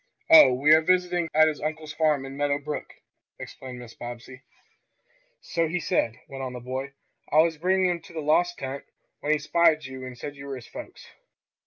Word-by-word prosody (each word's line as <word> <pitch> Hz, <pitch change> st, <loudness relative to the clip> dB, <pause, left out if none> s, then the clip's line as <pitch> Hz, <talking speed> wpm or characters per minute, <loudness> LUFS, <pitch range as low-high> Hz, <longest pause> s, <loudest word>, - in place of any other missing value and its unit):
"Oh, 320 Hz, -, +10 dB
we 135 Hz, +4 st, +2 dB
are 160 Hz, -, +6 dB
visiting 180 Hz, 0 st, +1 dB
at 155 Hz, 0 st, +5 dB
his 155 Hz, -2 st, -3 dB
uncle's 155 Hz, 0 st, -4 dB
farm 150 Hz, -3 st, +1 dB
at 135 Hz, -, -8 dB
Meadow 140 Hz, +1 st, 0 dB
Brook," 150 Hz, +1 st, -6 dB, 0.5 s
explained 130 Hz, -1 st, -9 dB
Mrs. 120 Hz, -2 st, -12 dB
Bobbsey. 120 Hz, +2 st, -9 dB, 1.0 s
"So 165 Hz, -1 st, -1 dB
he 175 Hz, +3 st, -2 dB
said," 125 Hz, -8 st, -1 dB
went 135 Hz, -1 st, -8 dB
on 130 Hz, -1 st, -5 dB
the 125 Hz, -, -6 dB
boy. 130 Hz, +3 st, -5 dB, 0.4 s
"I 155 Hz, +2 st, +6 dB
was 165 Hz, -2 st, -2 dB
bringing 185 Hz, +1 st, +2 dB
him 175 Hz, -, -3 dB
to 175 Hz, 0 st, -16 dB
the 165 Hz, -, -4 dB
lost 175 Hz, +4 st, +2 dB
tent, 135 Hz, +1 st, -5 dB, 0.4 s
when 150 Hz, -, -1 dB
he 155 Hz, -, +4 dB
spied 155 Hz, +1 st, +2 dB
you 130 Hz, -1 st, -8 dB
and 130 Hz, -1 st, -8 dB
said 145 Hz, +4 st, -7 dB
you 140 Hz, 0 st, -10 dB
were 135 Hz, -, -4 dB
his 125 Hz, -, -10 dB
folks." -, -, -10 dB
150 Hz, 200 wpm, -26 LUFS, 130-165 Hz, 1.0 s, Oh